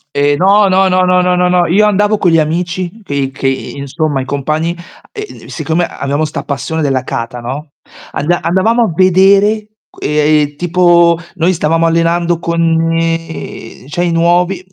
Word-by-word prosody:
Ehm, 145 Hz, 0 st, +2 dB
no, 200 Hz, +4 st, +4 dB
no, 190 Hz, +1 st, +3 dB
no, 185 Hz, 0 st, +2 dB
no, 180 Hz, 0 st, +3 dB
no, 180 Hz, 0 st, +2 dB
no, 180 Hz, -1 st, +2 dB
io 200 Hz, +5 st, +3 dB
andavo 210 Hz, +1 st, +1 dB
con 180 Hz, -, +2 dB
gli 165 Hz, -, +3 dB
amici 170 Hz, +3 st, -1 dB, 0.2 s
dei 140 Hz, -6 st, -2 dB
che, 135 Hz, 0 st, -3 dB
insomma 140 Hz, +2 st, -3 dB
i -, -, -5 dB
compagni, 155 Hz, +5 st, -2 dB, 0.4 s
uhm, 420 Hz, -2 st, -9 dB
siccome 165 Hz, +2 st, -1 dB
abbiamo 140 Hz, +2 st, -3 dB
'sta 155 Hz, -, -4 dB
passione 155 Hz, +3 st, -3 dB
della 135 Hz, -3 st, 0 dB
kata, 120 Hz, 0 st, -5 dB
no, 135 Hz, +5 st, -6 dB, 0.4 s
anda 175 Hz, +4 st, -1 dB
andavamo 220 Hz, +7 st, +2 dB
a 220 Hz, -, -1 dB
vedere, 195 Hz, +4 st, +3 dB, 0.2 s
uhm, 150 Hz, 0 st, 0 dB
tipo 170 Hz, 0 st, +3 dB, 0.2 s
noi 175 Hz, +1 st, +1 dB
stavamo 165 Hz, 0 st, +1 dB
allenando 170 Hz, +1 st, +1 dB
con 170 Hz, 0 st, -2 dB
uhm 165 Hz, -3 st, -2 dB
cioè 175 Hz, +5 st, -2 dB
i 175 Hz, -, 0 dB
nuovi, 175 Hz, +2 st, +1 dB
165 Hz, 160 wpm, -13 LUFS, 150-180 Hz, 0.4 s, no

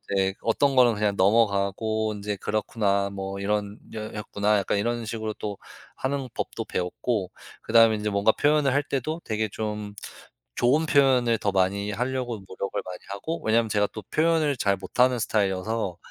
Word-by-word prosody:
네 95 Hz, 0 st, +2 dB
어떤 135 Hz, +4 st, +2 dB
거는 120 Hz, -3 st, +5 dB
그냥 105 Hz, -1 st, 0 dB
넘어가고 110 Hz, +1 st, +2 dB
인제 105 Hz, 0 st, -3 dB
'그렇구나.' 100 Hz, -1 st, 0 dB
뭐 95 Hz, 0 st, -5 dB
'이런 105 Hz, +1 st, -1 dB, 0.2 s
여 110 Hz, -1 st, -6 dB
였구나.' 105 Hz, 0 st, 0 dB
약간 100 Hz, -, -1 dB
이런 120 Hz, +2 st, -1 dB
식으로 110 Hz, -1 st, -4 dB
또 105 Hz, -2 st, -5 dB, 0.4 s
하는 135 Hz, 0 st, -2 dB
법도 -, -, -4 dB
배웠고 95 Hz, +2 st, -2 dB, 0.3 s
그다음에 115 Hz, -1 st, +5 dB
인제 105 Hz, 0 st, -2 dB
뭔가 100 Hz, +2 st, +3 dB
표현을 145 Hz, -2 st, +2 dB
할 145 Hz, +1 st, +2 dB
때도 150 Hz, +4 st, -3 dB
되게 110 Hz, 0 st, -1 dB
좀 105 Hz, -1 st, -4 dB, 0.6 s
좋은 145 Hz, +7 st, +3 dB
표현을 130 Hz, -5 st, +4 dB
더 100 Hz, -1 st, -1 dB
많이 100 Hz, +2 st, +1 dB
하려고 125 Hz, +2 st, -2 dB
노력을 100 Hz, +2 st, -4 dB
많이 90 Hz, -1 st, -7 dB
하고 160 Hz, +12 st, -4 dB
왜냐하면 115 Hz, +1 st, +2 dB
제가 105 Hz, -1 st, +2 dB
또 110 Hz, -, -7 dB
표현을 155 Hz, -3 st, +2 dB
잘 100 Hz, -1 st, +2 dB
못하는 125 Hz, +6 st, +2 dB
스타일이어서 100 Hz, -2 st, -1 dB
110 Hz, 350 characters per minute, -26 LUFS, 100-120 Hz, 0.6 s, 거는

